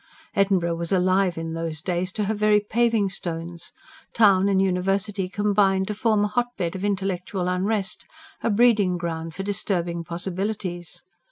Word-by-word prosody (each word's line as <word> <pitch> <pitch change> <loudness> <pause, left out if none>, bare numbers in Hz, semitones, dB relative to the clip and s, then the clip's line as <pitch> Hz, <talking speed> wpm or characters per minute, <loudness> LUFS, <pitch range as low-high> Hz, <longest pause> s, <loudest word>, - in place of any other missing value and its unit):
Edinburgh 185 -4 +2
was 170 0 -3
alive 185 -1 +2
in 165 0 -4
those 165 -2 -2
days 180 +1 -2
to 215 - -1
her 210 +2 0
very 210 0 +3
paving 225 0 +1
stones; 170 -2 -5 0.4
town 200 -3 +5
and 195 -1 +3
university 195 +1 0
combined 200 -1 +2
to - - 0
form 215 0 +2
a - - +2
hotbed 210 -7 -2
of 190 - -5
intellectual 190 -2 -1
unrest, 195 +3 -1 0.3
a - - 0
breeding 205 -5 +3
ground 165 -1 -4
for 195 - -4
disturbing 175 -4 -2
possibilities. 175 +1 -3
190 Hz, 150 wpm, -24 LUFS, 175-205 Hz, 0.4 s, town